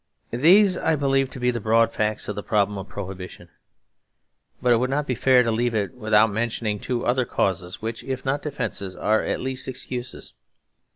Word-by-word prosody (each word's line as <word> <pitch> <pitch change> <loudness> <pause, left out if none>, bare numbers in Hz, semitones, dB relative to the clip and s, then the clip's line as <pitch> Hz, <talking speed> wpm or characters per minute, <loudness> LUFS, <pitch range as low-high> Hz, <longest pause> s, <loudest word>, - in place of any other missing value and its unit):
These 185 - +5
I 160 - +2
believe 135 -2 +1
to 130 - -9
be 125 0 +2
the 120 - -3
broad 115 +1 +3
facts 105 -1 -1
of 105 - -3
the 105 - -4
problem 105 -1 +1
of 95 - -8
Prohibition; 95 -2 -8 1.1
but 125 -1 +3
it - - +4
would 125 +2 0
not 145 +2 0
be 130 - -1
fair 125 +1 +4
to 115 - 0
leave 120 +1 0
it 105 +3 -1
without 110 -2 +3
mentioning 110 -1 -2
two 120 +2 -3
other 130 +1 +2
causes 90 -4 -2
which, 115 0 -4
if 130 -1 -5
not 140 +2 0
defences, 100 -10 -4
are 110 +4 +1
at - - -2
least 130 0 -3
excuses. 125 -1 -5
120 Hz, 190 wpm, -24 LUFS, 105-130 Hz, 1.1 s, These